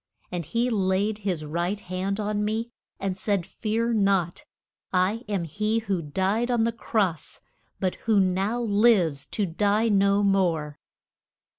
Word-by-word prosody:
And 175 Hz, -2 st, -3 dB
he 235 Hz, +8 st, 0 dB
laid 200 Hz, +1 st, +1 dB
his 180 Hz, -7 st, -2 dB
right 175 Hz, +6 st, -2 dB
hand 190 Hz, +1 st, -3 dB
on 210 Hz, 0 st, -1 dB
me, 220 Hz, +3 st, -2 dB, 0.3 s
and 195 Hz, -1 st, -2 dB
said, 195 Hz, -2 st, -1 dB
Fear 230 Hz, +2 st, -1 dB
not; 195 Hz, -5 st, +1 dB, 0.5 s
I 190 Hz, +6 st, +1 dB
am 195 Hz, -4 st, 0 dB
he 210 Hz, +7 st, -1 dB
who 200 Hz, -6 st, -1 dB
died 195 Hz, -, 0 dB
on 240 Hz, -2 st, +2 dB
the 230 Hz, -, +1 dB
cross, 205 Hz, -7 st, -2 dB, 0.4 s
but 185 Hz, -2 st, 0 dB, 0.2 s
who 215 Hz, -2 st, +5 dB
now 195 Hz, +5 st, +1 dB
lives 200 Hz, -, +3 dB
to 210 Hz, -, -1 dB
die 205 Hz, +6 st, +1 dB
no 200 Hz, 0 st, +3 dB
more. 170 Hz, -7 st, +1 dB
200 Hz, 145 wpm, -26 LUFS, 185-215 Hz, 0.5 s, who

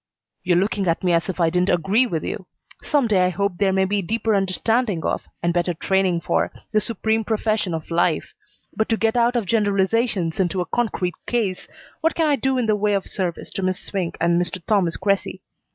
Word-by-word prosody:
"You're 175 Hz, -1 st, +2 dB
looking 195 Hz, 0 st, 0 dB
at 165 Hz, +2 st, 0 dB
me 180 Hz, -1 st, +2 dB
as 170 Hz, +2 st, +1 dB
if 185 Hz, -, -4 dB
I 165 Hz, -1 st, +3 dB
didn't 180 Hz, +2 st, +1 dB
agree 200 Hz, +9 st, +3 dB
with 165 Hz, -8 st, -3 dB
you. 190 Hz, -, -5 dB, 0.3 s
Some 290 Hz, -4 st, +1 dB
day 200 Hz, -5 st, +3 dB
I 180 Hz, -, +3 dB
hope 200 Hz, -1 st, -1 dB
there 200 Hz, -2 st, +3 dB
may 190 Hz, 0 st, +2 dB
be 200 Hz, +1 st, 0 dB
deeper 225 Hz, +4 st, 0 dB
understanding 200 Hz, 0 st, 0 dB
of, -, -, 0 dB, 0.2 s
and 170 Hz, 0 st, +1 dB
better 175 Hz, 0 st, 0 dB
training 185 Hz, 0 st, +1 dB
for, 85 Hz, -, 0 dB, 0.2 s
the 215 Hz, -1 st, +3 dB
supreme 220 Hz, 0 st, -1 dB
profession 215 Hz, -5 st, 0 dB
of 160 Hz, +1 st, -7 dB
life; 170 Hz, +1 st, +1 dB, 0.4 s
but 220 Hz, -, 0 dB
to 225 Hz, -, +2 dB
get 225 Hz, +1 st, +1 dB
out 240 Hz, +1 st, +3 dB
of 235 Hz, -4 st, 0 dB
generalizations 200 Hz, -2 st, +1 dB
into 185 Hz, 0 st, +1 dB
a 180 Hz, -, 0 dB
concrete 190 Hz, -4 st, -1 dB
case, 215 Hz, -7 st, -1 dB, 0.3 s
what 325 Hz, 0 st, +1 dB
can 325 Hz, -, +2 dB
I 295 Hz, -2 st, +3 dB
do 265 Hz, 0 st, 0 dB
in 245 Hz, -, +1 dB
the 215 Hz, -1 st, +2 dB
way 210 Hz, 0 st, +1 dB
of 195 Hz, -, -1 dB
service 180 Hz, -4 st, -4 dB
to -, -, -4 dB
Miss 185 Hz, 0 st, -1 dB
Swink 185 Hz, -4 st, -4 dB
and 170 Hz, +1 st, +2 dB
Mr. 175 Hz, +1 st, -3 dB
Thomas 190 Hz, -6 st, +1 dB
Cressy? 195 Hz, 0 st, -1 dB
195 Hz, 215 wpm, -22 LUFS, 175-220 Hz, 0.4 s, I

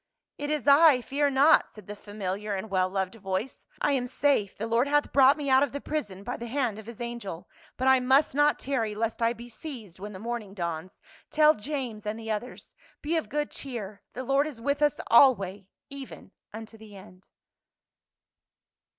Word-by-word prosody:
" -, -, -63 dB
It 290 Hz, -, -3 dB
is 300 Hz, -3 st, -2 dB
I, 285 Hz, -2 st, +7 dB
fear 285 Hz, +3 st, 0 dB
not," 280 Hz, +3 st, +4 dB
said 210 Hz, -, -14 dB
the 210 Hz, -, -7 dB
famiHar 205 Hz, 0 st, -4 dB
and 205 Hz, +2 st, -7 dB
well 185 Hz, -1 st, +2 dB
loved 190 Hz, -1 st, -2 dB
voice. 195 Hz, +2 st, -5 dB
" -, -, -30 dB
I -, -, +2 dB
am 255 Hz, -3 st, 0 dB
safe; 260 Hz, -6 st, 0 dB
the 220 Hz, -, -3 dB
Lord 230 Hz, +4 st, +1 dB
hath 295 Hz, +1 st, +1 dB
brought 275 Hz, +1 st, +6 dB
me 290 Hz, -2 st, -4 dB
out 265 Hz, 0 st, +5 dB
of 280 Hz, -2 st, 0 dB
the 285 Hz, -, -3 dB
prison 205 Hz, -12 st, -4 dB
by 245 Hz, +4 st, -4 dB
the 235 Hz, -, -7 dB
hand 240 Hz, -4 st, -1 dB
of 220 Hz, -, -12 dB
his 235 Hz, -2 st, -10 dB
angel. 235 Hz, -8 st, -6 dB, 0.3 s
But 260 Hz, -, 0 dB
I 265 Hz, 0 st, +6 dB
must 265 Hz, +3 st, +3 dB
not 290 Hz, +1 st, +3 dB
tarry 230 Hz, -6 st, -2 dB
lest 225 Hz, +1 st, -2 dB
I 230 Hz, +1 st, +2 dB
be 235 Hz, +1 st, -11 dB
seized 230 Hz, -, -9 dB
when 205 Hz, +2 st, -7 dB
the -, -, -8 dB
morning 220 Hz, -2 st, -5 dB
dawns. 170 Hz, -1 st, -5 dB, 0.3 s
Tell 305 Hz, 0 st, +5 dB
James* 230 Hz, -4 st, -5 dB
and 210 Hz, +1 st, -2 dB
the 225 Hz, -1 st, -5 dB
others. 215 Hz, +4 st, -6 dB, 0.3 s
Be 315 Hz, +3 st, -1 dB
of 320 Hz, -, -2 dB
good 295 Hz, 0 st, -2 dB
cheer; 215 Hz, -7 st, -7 dB
the 255 Hz, -, -5 dB
Lord 275 Hz, +3 st, +2 dB
is 280 Hz, -7 st, -8 dB
with 280 Hz, +5 st, -1 dB
us 295 Hz, -1 st, +2 dB
alway, 200 Hz, -6 st, +4 dB, 0.2 s
even 275 Hz, -7 st, -10 dB, 0.2 s
unto 225 Hz, +1 st, -10 dB
the 215 Hz, -2 st, -13 dB
end." 185 Hz, -1 st, -15 dB
235 Hz, 200 wpm, -27 LUFS, 205-280 Hz, 0.3 s, I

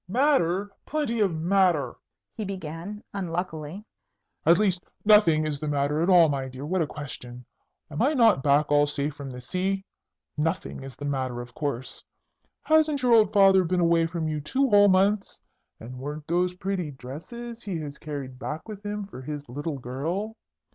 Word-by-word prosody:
"Matter? 205 Hz, -, +2 dB, 0.2 s
Plenty 285 Hz, -7 st, -1 dB
of 200 Hz, -3 st, +3 dB
matter!" 175 Hz, -2 st, +2 dB, 0.4 s
he 220 Hz, -, -5 dB
began, 185 Hz, +1 st, -6 dB
unluckily. 175 Hz, -1 st, -4 dB, 0.6 s
"At 170 Hz, +1 st, +7 dB
least, 185 Hz, -3 st, +1 dB, 0.2 s
nothing 175 Hz, -8 st, +5 dB
is 150 Hz, -2 st, -2 dB
the 155 Hz, -, -4 dB
matter 145 Hz, +1 st, 0 dB
at 170 Hz, -, +1 dB
all, 175 Hz, -3 st, +7 dB
my 135 Hz, -3 st, -2 dB
dear. 130 Hz, +2 st, -8 dB
What 180 Hz, +3 st, 0 dB
a 160 Hz, -, 0 dB
question! 125 Hz, -4 st, -8 dB, 0.5 s
Am 150 Hz, -, -3 dB
I 290 Hz, +5 st, +3 dB
not 225 Hz, -, +5 dB
back 145 Hz, +1 st, +3 dB
all 145 Hz, 0 st, +5 dB
safe 145 Hz, 0 st, -2 dB
from 140 Hz, -1 st, -8 dB
the 125 Hz, -1 st, -8 dB
sea? 190 Hz, +8 st, -2 dB, 0.5 s
Nothing 160 Hz, 0 st, -2 dB
is 135 Hz, -2 st, -9 dB
the 145 Hz, -, -7 dB
matter, 130 Hz, -3 st, -2 dB
of 120 Hz, 0 st, -8 dB
course! 140 Hz, -4 st, -4 dB, 0.6 s
Hasn't 310 Hz, -3 st, +3 dB
your 245 Hz, -1 st, +4 dB
old 215 Hz, -3 st, +5 dB
father 195 Hz, -2 st, +6 dB
been 180 Hz, +1 st, 0 dB
away 170 Hz, -1 st, +3 dB
from 165 Hz, -1 st, -3 dB
you 155 Hz, -1 st, -2 dB
two 270 Hz, -, +1 dB
whole 205 Hz, 0 st, +7 dB
months? 195 Hz, +2 st, +2 dB, 0.4 s
And 125 Hz, +3 st, -9 dB
weren't 145 Hz, +3 st, -6 dB
those 180 Hz, +2 st, 0 dB
pretty 185 Hz, -3 st, -2 dB
dresses 170 Hz, -, -8 dB
he 190 Hz, -5 st, -4 dB
has 150 Hz, -1 st, -7 dB
carried 140 Hz, -4 st, -6 dB
back 150 Hz, +7 st, -5 dB
with 210 Hz, -2 st, -8 dB
him 205 Hz, 0 st, -4 dB
for 195 Hz, -9 st, -10 dB
his 145 Hz, +1 st, -6 dB
little 145 Hz, +4 st, -4 dB
girl? 160 Hz, -, -3 dB
165 Hz, 175 wpm, -26 LUFS, 145-200 Hz, 0.6 s, At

